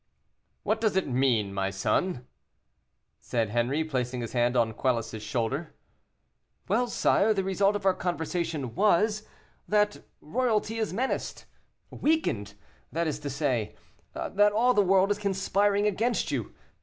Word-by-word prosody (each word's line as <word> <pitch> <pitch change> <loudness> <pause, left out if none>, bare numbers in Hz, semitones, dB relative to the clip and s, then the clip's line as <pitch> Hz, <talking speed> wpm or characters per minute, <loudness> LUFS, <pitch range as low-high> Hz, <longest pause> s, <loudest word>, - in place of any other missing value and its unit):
"What 220 +1 0
does 215 -4 +1
it 190 - +1
mean, 125 -6 +1
my 95 0 -1
son?" 115 - -1 0.9
said 115 -3 -1
Henri, 120 +7 +1
placing 125 -5 -2
his 115 - -6
hand 120 0 +2
on 115 -2 +2
Quelus's 115 -3 -1
shoulder. 120 +8 -3 0.9
"Well, 235 +6 +1
sire, 220 -2 +2
the 195 - 0
result 195 +2 +2
of 205 - -4
our 190 - +5
conversation 165 -6 -3
was, 210 +2 +2 0.4
that 210 0 +1 0.2
royalty 225 +4 -1
is 220 - -1
menaced 250 +8 -3 0.5
weakened, 115 - 0 0.4
that 170 +2 -1
is 150 -2 -2
to 145 -1 -5
say, 130 -6 -1 0.4
that 205 +1 +2
all 245 +4 +3
the 210 - +4
world 195 +1 +3
is 205 - 0
conspiring 200 +1 +1
against 220 +4 0
you. - - -3
175 Hz, 140 wpm, -28 LUFS, 125-210 Hz, 0.9 s, our